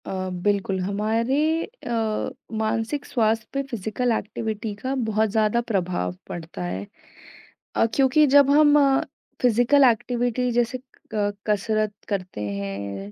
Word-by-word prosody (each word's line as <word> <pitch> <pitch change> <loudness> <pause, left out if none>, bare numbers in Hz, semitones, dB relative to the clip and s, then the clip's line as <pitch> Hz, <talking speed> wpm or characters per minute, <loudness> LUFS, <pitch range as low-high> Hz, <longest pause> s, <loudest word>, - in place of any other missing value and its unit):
अ, 185 -1 -3 0.2
बिल्कुल 200 -2 +1
हमारे 220 +7 0 0.2
अ, 230 - -3 0.3
मानसिक 225 +6 -1
स्वास्थ्य 220 -2 0
पे 275 - 0
फिज़िकल 235 +3 -1
एक्टिविटी 220 0 -3
का 260 +6 -3 0.2
बहुत 215 0 +2
ज़्यादा 215 +2 +2
प्रभाव 175 - -1
पड़ता 165 - -6
है 90 +3 -4 0.9
अ, - - +4
क्योंकि 275 +3 +5
जब 280 0 +6
हम 295 0 +6 0.6
फिज़िकल 245 +4 +4
एक्टिविटी 245 +1 +1
जैसे 240 +1 +1 0.4
क 205 -1 0
कसरत 215 0 0 0.2
करते 185 - -3
हैं 100 0 -5
220 Hz, 120 wpm, -24 LUFS, 195-245 Hz, 0.9 s, जब